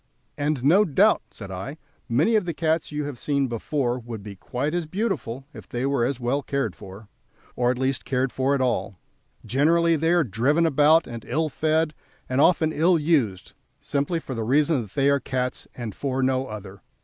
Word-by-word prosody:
"And 145 Hz, -3 st, -1 dB
no 175 Hz, +9 st, +6 dB
doubt," 205 Hz, +5 st, +3 dB
said 100 Hz, -3 st, -9 dB
I, 95 Hz, -, -6 dB, 0.3 s
"many 150 Hz, -, +3 dB
of 210 Hz, -4 st, +2 dB
the 170 Hz, -3 st, -3 dB
cats 160 Hz, -1 st, 0 dB
you 150 Hz, 0 st, -2 dB
have 145 Hz, -4 st, -5 dB
seen 140 Hz, -2 st, +1 dB
before 125 Hz, +1 st, -1 dB
would 115 Hz, -3 st, -8 dB
be 100 Hz, -1 st, -8 dB
quite 125 Hz, -, -3 dB
as 175 Hz, -2 st, -1 dB
beautiful 155 Hz, -, -3 dB
if -, -, -12 dB
they 120 Hz, +2 st, -2 dB
were 140 Hz, -3 st, +1 dB
as 130 Hz, 0 st, -2 dB
well 125 Hz, +4 st, 0 dB
cared 140 Hz, -8 st, -2 dB
for, 100 Hz, +1 st, -11 dB, 0.5 s
or 120 Hz, 0 st, +1 dB
at 125 Hz, -, 0 dB
least 130 Hz, 0 st, 0 dB
cared 130 Hz, -1 st, 0 dB
for 135 Hz, +2 st, +1 dB
at 135 Hz, -, -1 dB
all; 120 Hz, -6 st, -1 dB, 0.5 s
generally 165 Hz, +5 st, +3 dB
they 160 Hz, +1 st, +1 dB
are 175 Hz, -1 st, +4 dB
driven 135 Hz, -, +1 dB
about 155 Hz, +2 st, +4 dB
and 115 Hz, -1 st, -8 dB
ill 160 Hz, 0 st, 0 dB
fed, 155 Hz, +2 st, +1 dB, 0.3 s
and 130 Hz, +2 st, +1 dB
often 160 Hz, -1 st, +3 dB
ill 170 Hz, +3 st, +3 dB
used, 140 Hz, -, 0 dB, 0.3 s
simply 145 Hz, +4 st, -1 dB
for 135 Hz, -, -7 dB
the 115 Hz, -2 st, -3 dB
reason 145 Hz, +4 st, +2 dB
that 105 Hz, -4 st, -10 dB
they 140 Hz, -1 st, +3 dB
are 140 Hz, 0 st, +4 dB
cats, 125 Hz, -1 st, -3 dB
and 115 Hz, -4 st, -5 dB
for 135 Hz, +3 st, -2 dB
no 130 Hz, 0 st, +1 dB
other. 100 Hz, -2 st, -9 dB
140 Hz, 195 wpm, -24 LUFS, 120-155 Hz, 0.5 s, no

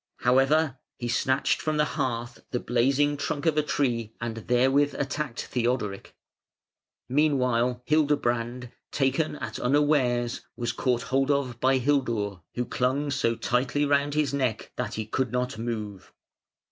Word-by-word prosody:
However, 135 Hz, +3 st, +3 dB, 0.2 s
he 120 Hz, -, -4 dB
snatched 130 Hz, +3 st, +1 dB
from 155 Hz, -1 st, -1 dB
the 150 Hz, -, +3 dB
hearth 120 Hz, -5 st, -3 dB
the 125 Hz, -, -1 dB
blazing 135 Hz, +5 st, +2 dB
trunk 145 Hz, +2 st, -3 dB
of 160 Hz, -2 st, +3 dB
a 155 Hz, -, +4 dB
tree 120 Hz, -7 st, -1 dB
and 115 Hz, -1 st, -3 dB
therewith 130 Hz, +5 st, +2 dB
attacked 140 Hz, -2 st, -3 dB
Theodoric. 120 Hz, -5 st, -2 dB, 0.9 s
Meanwhile 125 Hz, -4 st, +1 dB
Hildebrand, 125 Hz, -5 st, 0 dB, 0.2 s
taken 140 Hz, +3 st, +1 dB
at 120 Hz, -6 st, -6 dB
unawares, 125 Hz, -3 st, +2 dB
was 120 Hz, -1 st, -2 dB
caught 120 Hz, +1 st, 0 dB
hold 135 Hz, +1 st, +1 dB
of 135 Hz, -5 st, 0 dB
by 130 Hz, +1 st, +3 dB
Hildur, 120 Hz, -8 st, 0 dB, 0.2 s
who 125 Hz, -, -1 dB
clung 135 Hz, +5 st, 0 dB
so 115 Hz, -4 st, +1 dB
tightly 125 Hz, +5 st, 0 dB
round 145 Hz, 0 st, +1 dB
his 150 Hz, -3 st, +1 dB
neck 130 Hz, -6 st, -1 dB
that -, -, -3 dB
he 110 Hz, -, -3 dB
could 125 Hz, +2 st, -1 dB
not 125 Hz, -2 st, -2 dB
move. 105 Hz, -4 st, -5 dB
130 Hz, 140 wpm, -27 LUFS, 120-145 Hz, 0.9 s, a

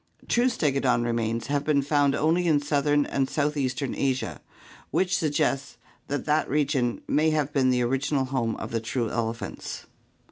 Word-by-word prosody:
True 245 Hz, +2 st, +3 dB
Stegodon 135 Hz, -, +1 dB
remains 115 Hz, -1 st, -1 dB
have 145 Hz, +1 st, -1 dB
been 145 Hz, -2 st, +2 dB
found 140 Hz, -1 st, +2 dB
only 170 Hz, +3 st, +2 dB
in 155 Hz, -3 st, +4 dB
southern 145 Hz, 0 st, +1 dB
and 135 Hz, -1 st, -1 dB
southeastern 140 Hz, -3 st, -1 dB
Asia, 130 Hz, -1 st, -2 dB, 0.5 s
which 185 Hz, -1 st, +1 dB
suggests 145 Hz, -2 st, 0 dB, 0.3 s
that 145 Hz, -1 st, -3 dB
that 150 Hz, +1 st, +1 dB
region 135 Hz, -4 st, 0 dB
may 155 Hz, +2 st, +3 dB
have 150 Hz, -2 st, 0 dB
been 135 Hz, -3 st, +3 dB
the 125 Hz, -1 st, +2 dB
original 135 Hz, +2 st, 0 dB
home 130 Hz, -4 st, -1 dB
of -, -, -6 dB
the 115 Hz, -, 0 dB
true 115 Hz, 0 st, -2 dB
elephants. 115 Hz, 0 st, -4 dB
140 Hz, 155 wpm, -26 LUFS, 125-150 Hz, 0.5 s, in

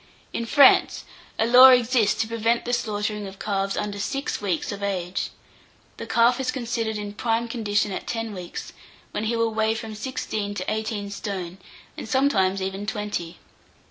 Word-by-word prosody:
In 235 Hz, -, -3 dB
France, 280 Hz, +1 st, +5 dB, 0.3 s
a 225 Hz, -, +2 dB
law 250 Hz, +3 st, +9 dB
exists 245 Hz, -3 st, +3 dB
to 225 Hz, -, -1 dB
prevent 230 Hz, +1 st, 0 dB
the 245 Hz, -, -2 dB
slaughtering 210 Hz, -2 st, -2 dB
of 190 Hz, 0 st, -10 dB
calves 195 Hz, -1 st, -2 dB
under 205 Hz, -1 st, -3 dB
six 275 Hz, +5 st, -3 dB
weeks 185 Hz, -6 st, -1 dB
of 205 Hz, 0 st, -6 dB
age. 185 Hz, -2 st, -2 dB, 0.7 s
The 230 Hz, -, -7 dB
calf 235 Hz, +2 st, +3 dB
is 260 Hz, -1 st, -1 dB
considered 230 Hz, -4 st, -2 dB
in 205 Hz, -1 st, -5 dB
prime 230 Hz, +2 st, -1 dB
condition 210 Hz, -3 st, 0 dB
at -, -, -5 dB
ten 225 Hz, -2 st, -3 dB
weeks, 180 Hz, -3 st, -7 dB, 0.4 s
when 215 Hz, -, -3 dB
he 230 Hz, +2 st, 0 dB
will 230 Hz, -1 st, 0 dB
weigh 220 Hz, 0 st, +1 dB
from 225 Hz, -1 st, -6 dB
sixteen 215 Hz, -3 st, -4 dB
to -, -, -4 dB
eighteen 215 Hz, -2 st, -3 dB
stone, 195 Hz, -3 st, -5 dB, 0.4 s
and -, -, -7 dB
sometimes 195 Hz, -8 st, +2 dB
even 195 Hz, +2 st, -4 dB
twenty. 205 Hz, -5 st, -4 dB
215 Hz, 170 wpm, -24 LUFS, 200-230 Hz, 0.7 s, law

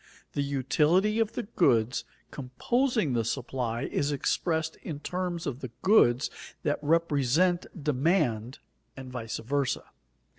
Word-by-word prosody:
The 145 Hz, -, 0 dB
utility 150 Hz, -, +2 dB
of 225 Hz, -1 st, +1 dB
the 245 Hz, -, -3 dB
goods 125 Hz, -, +2 dB, 0.3 s
composing 215 Hz, -, 0 dB
the 115 Hz, -1 st, +1 dB
supply 120 Hz, 0 st, -2 dB
is 145 Hz, +1 st, -1 dB
expressed 160 Hz, +3 st, 0 dB
in 150 Hz, -3 st, -6 dB
terms 180 Hz, +1 st, -3 dB
of 135 Hz, -3 st, -3 dB
the 130 Hz, -, -6 dB
goods 150 Hz, -, +4 dB, 0.3 s
that 145 Hz, -, 0 dB
represent 165 Hz, +2 st, +2 dB, 0.2 s
demand 135 Hz, -, +1 dB, 0.4 s
and 130 Hz, -1 st, -8 dB
vice 115 Hz, -3 st, -4 dB
versa. 140 Hz, +2 st, -1 dB
145 Hz, 120 wpm, -28 LUFS, 125-175 Hz, 0.4 s, goods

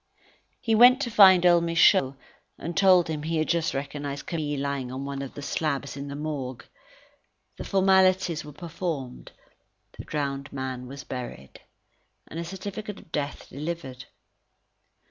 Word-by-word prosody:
He 225 Hz, -3 st, 0 dB
went 245 Hz, +4 st, +7 dB
to 235 Hz, -, -3 dB
find 190 Hz, -4 st, +7 dB
old 175 Hz, -1 st, +5 dB
Michaud, 170 Hz, -4 st, +4 dB, 0.4 s
and 170 Hz, +1 st, -6 dB
told 185 Hz, -2 st, +5 dB
him 155 Hz, -2 st, -3 dB
he 160 Hz, +2 st, -2 dB
had 155 Hz, -, 0 dB
just 170 Hz, -3 st, 0 dB
recognized 140 Hz, 0 st, -5 dB
Camille 150 Hz, -4 st, -3 dB
lying 140 Hz, -2 st, -3 dB
on 130 Hz, +2 st, -5 dB
one 140 Hz, 0 st, -4 dB
of 135 Hz, -, -7 dB
the 145 Hz, -, -7 dB
slabs 140 Hz, -2 st, -2 dB
in 140 Hz, 0 st, -6 dB
the 140 Hz, -, -6 dB
Morgue. 140 Hz, -5 st, -5 dB, 0.9 s
The -, -, -6 dB
formalities 190 Hz, -3 st, +3 dB
were 150 Hz, -, -10 dB
performed, 155 Hz, -4 st, -5 dB, 0.7 s
the -, -, -5 dB
drowned 140 Hz, -2 st, -3 dB
man 130 Hz, -2 st, -5 dB
was 140 Hz, +1 st, -9 dB
buried, 120 Hz, -, -8 dB, 0.7 s
and 165 Hz, -, -7 dB
a -, -, -3 dB
certificate 200 Hz, +3 st, -6 dB
of 160 Hz, -, -17 dB
death 145 Hz, -1 st, -4 dB
delivered. 145 Hz, -4 st, -6 dB
150 Hz, 150 wpm, -26 LUFS, 140-175 Hz, 0.9 s, went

